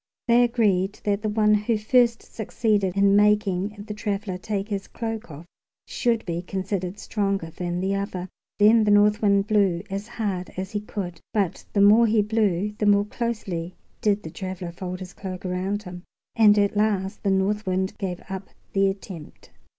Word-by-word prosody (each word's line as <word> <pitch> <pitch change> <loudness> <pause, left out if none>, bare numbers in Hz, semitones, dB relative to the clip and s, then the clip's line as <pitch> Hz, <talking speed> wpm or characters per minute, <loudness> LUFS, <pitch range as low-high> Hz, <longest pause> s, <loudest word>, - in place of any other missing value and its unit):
They 240 +1 +5
agreed 210 -5 +1
that 205 0 0
the 215 - -1
one 210 0 +3
who 210 +2 +1
first 235 +2 +3
succeeded 205 -3 -1
in 200 0 +5
making 205 -1 +2
the 210 - -4
traveler 205 -3 -3
take 200 0 -3
his 200 -2 -3
cloak 225 -2 -5
off 155 +2 -10 0.4
should 235 -2 0
be 170 -1 -2
considered 190 0 -3
stronger 195 -7 -2
than 175 +1 -3
the 190 +1 0
other. 195 -2 -3 0.3
Then 215 +2 +6
the 210 - +1
North 205 +1 +4
Wind 200 -2 +3
blew 200 -5 +2
as 200 +2 -4
hard 200 -6 -3
as 190 0 -4
he 210 - -1
could, 190 -5 -6
but 195 -5 0
the 200 - +3
more 215 +3 +7
he 215 -1 +3
blew 210 -2 0
the 210 - +1
more 205 0 +4
closely 200 -7 -4 0.3
did 205 -1 +1
the 160 - -7
traveler 185 -2 -6
fold 180 +1 -6
his 185 0 -8
cloak 185 -1 -7
around 190 +3 -2
him; 180 -2 -8 0.3
and 210 -2 +6
at 205 0 +2
last 205 -2 0
the 200 - 0
North 195 +2 +1
Wind 190 +1 -1
gave 185 -4 -4
up 190 0 -6 0.3
the 195 0 +3
attempt. 190 -5 -9
200 Hz, 180 wpm, -24 LUFS, 185-210 Hz, 0.4 s, more